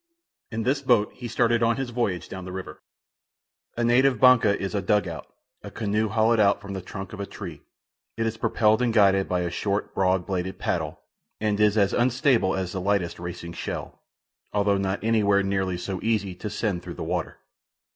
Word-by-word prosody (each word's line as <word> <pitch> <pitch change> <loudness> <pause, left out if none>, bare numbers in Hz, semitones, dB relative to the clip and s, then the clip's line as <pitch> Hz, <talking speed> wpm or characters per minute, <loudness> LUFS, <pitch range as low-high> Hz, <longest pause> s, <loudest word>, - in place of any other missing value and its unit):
In 110 0 -2
this 135 +3 +1
boat 120 -6 +3
he 125 - -7
started 120 0 +2
on 115 0 +3
his 135 -2 -3
voyage 100 -8 -1
down 95 -1 -7
the 90 - -7
river. 95 0 -7 1.0
A 120 - 0
native 125 +1 +3
"banca" 115 -5 +5
is 95 +1 -3
a 100 - 0
"dug 105 +1 +2
out," 85 -1 -7 0.3
a - - -8
canoe 110 0 -1
hollowed 110 +2 +3
out 100 -1 +4
from 100 -1 -8
the 95 - -4
trunk 95 +1 -8
of 105 - -8
a 100 - -4
tree. 85 -8 -8 0.6
It 115 - 0
is 115 0 -1
propelled 110 0 +2
and 120 -2 +2
guided 100 -3 +4
by 90 -1 +1
a 85 -1 -2
short, 100 +3 -2
broad 95 -2 +1
bladed 95 -1 -3
paddle, - - -2 0.4
and 105 -1 0
is 105 0 +3
as 100 -2 +3
unstable 125 -4 +2
as 95 -2 -3
the 95 - -4
lightest 95 -3 0
racing 85 0 -6
shell, - - -6 0.5
although 100 -1 +2
not 95 +1 -2
any 115 0 +2
where 100 -1 +3
nearly 95 -2 -1
so 95 +1 -4
easy 105 -4 0
to 105 +4 -6
send 105 -4 -2
through - - -8
the - - -5
water. - - -3
100 Hz, 200 wpm, -25 LUFS, 95-115 Hz, 1.0 s, banca